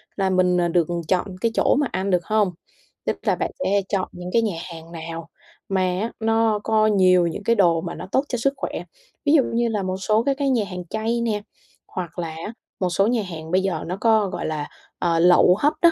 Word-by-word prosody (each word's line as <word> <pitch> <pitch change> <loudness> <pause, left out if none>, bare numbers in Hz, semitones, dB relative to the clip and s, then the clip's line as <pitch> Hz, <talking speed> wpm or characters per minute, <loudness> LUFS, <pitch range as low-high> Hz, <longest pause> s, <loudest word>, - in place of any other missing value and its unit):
là 195 -1 +1
mình, 180 -1 +3
à, 175 - +2
được 170 -1 +2 0.2
chọn 185 +1 +1
cái 230 - +2
chỗ - - +3
mà 285 -1 +1
ăn 195 +1 -2
được 180 -1 +1
hông? 215 -3 +2 0.5
Tức - - -1
là - - +2
bạn - - -2
sẽ 200 +1 +2
chọn 195 -2 -1
những 180 0 -7
cái 230 - +4
nhà 210 -6 -1 0.2
hàng 165 +1 -11
nào 165 0 -7 0.4
mà 190 -1 +1
á, 185 +5 -1
nó 225 -1 +2
có 215 -1 +3
nhiều 185 -4 +4
những 170 +5 -5
cái 230 +2 +3
đồ 170 -5 +3
mà 170 - -5
nó - - -7
tốt 265 - +2
cho 245 - -1
sức 275 +4 +1
khỏe. - - -4 0.4
Ví 290 - +4
dụ 280 -5 +6
như 235 0 +2
là 210 -3 -1
một 185 0 -2
số 215 +4 +1
các 275 -1 0
cái 280 -1 0
nhà 235 -5 +2
hàng 180 -2 -7
chay 225 +2 -1
nè, 215 -3 -1 0.5
hoặc 180 -1 -6
là 165 -2 -2
á, 165 +7 -7 0.3
một 185 - +1
số 195 +4 +2
nhà 235 -3 +1
hàng 165 -3 -8
bây 185 - +3
giờ 190 -5 -2
nó 180 +2 -3
có, 220 -4 +3
gọi - - -4
là, 150 -2 -3 0.3
ờ, 170 -1 +1
lẩu 180 +1 +6
hấp 295 +1 +3
đó. 340 -1 +7
190 Hz, 240 wpm, -23 LUFS, 175-225 Hz, 0.5 s, đó